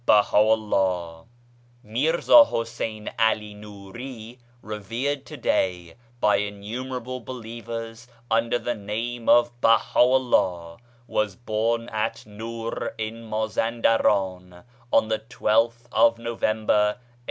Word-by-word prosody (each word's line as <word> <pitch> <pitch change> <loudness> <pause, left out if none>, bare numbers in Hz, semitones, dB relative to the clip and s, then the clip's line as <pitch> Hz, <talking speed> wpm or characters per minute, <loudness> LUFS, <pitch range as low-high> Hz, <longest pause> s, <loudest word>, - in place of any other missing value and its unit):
f - - -33
BAHA'U'LLAH 100 -5 +2 0.6
MIrza 160 - +5
Husain 115 -2 -4
( - - -12
AlI 110 -2 +1
Nuri, 110 +4 -10 0.2
revered 115 +7 -3
to 150 - -9
day 90 -8 -1 0.3
by 105 -3 +3
innumerable 120 +5 -5
believers 115 -1 -7 0.2
under 115 +2 +2
the 120 - -2
name 115 +3 -4
of 120 0 +5
BahaVllah, 115 -8 +2 0.3
was 105 -4 -1
born 115 +1 -1
at 110 +1 -3
Nur 115 +2 -5
in 110 +1 -5
Mazan 110 +2 -2
deran 95 -5 +1 0.3
on 110 - +3
the 110 -1 0
12th 115 +1 0
of 115 0 +4
November 110 -2 -1 0.3
1817. - - -30
115 Hz, 105 wpm, -24 LUFS, 105-120 Hz, 0.6 s, MIrza